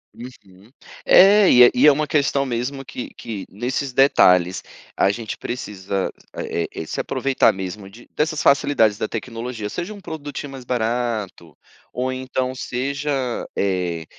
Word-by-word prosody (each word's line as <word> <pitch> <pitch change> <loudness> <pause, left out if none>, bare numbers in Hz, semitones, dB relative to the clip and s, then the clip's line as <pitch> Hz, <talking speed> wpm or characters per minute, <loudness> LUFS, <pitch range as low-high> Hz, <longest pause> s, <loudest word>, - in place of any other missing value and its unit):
Uhum. 105 -4 -14 0.4
É, 200 +1 +7
e 125 - +8
é 120 - +7
e 135 +4 +5
é - - +9
uma 150 +2 0
questão 140 -3 +1
mesmo 130 +2 -4
que 125 - -7
que 110 -5 -7
nesses 125 +5 -3
detalhes 90 -9 +4 0.3
a - - +3
gente 110 +1 -4
precisa, 100 -5 -4 0.3
eh 85 - -2
eh - - -6
eh, - - -10
se - - -5
aproveitar 135 -1 +2
mesmo 95 +1 -7
de 115 +5 -16
dessas 155 0 -1
facilidades 135 -7 +3
da 110 - -1
tecnologia, 115 -1 -5
seja 175 +3 -5
um 210 - -9
produtinho 145 -4 -7
mais 135 -2 -10
barato 115 -8 -3 0.3
ou 130 +1 -2
então 130 0 -3
seja, 140 +4 -3 0.5
eh, 90 -4 -1
125 Hz, 150 wpm, -21 LUFS, 100-140 Hz, 0.5 s, é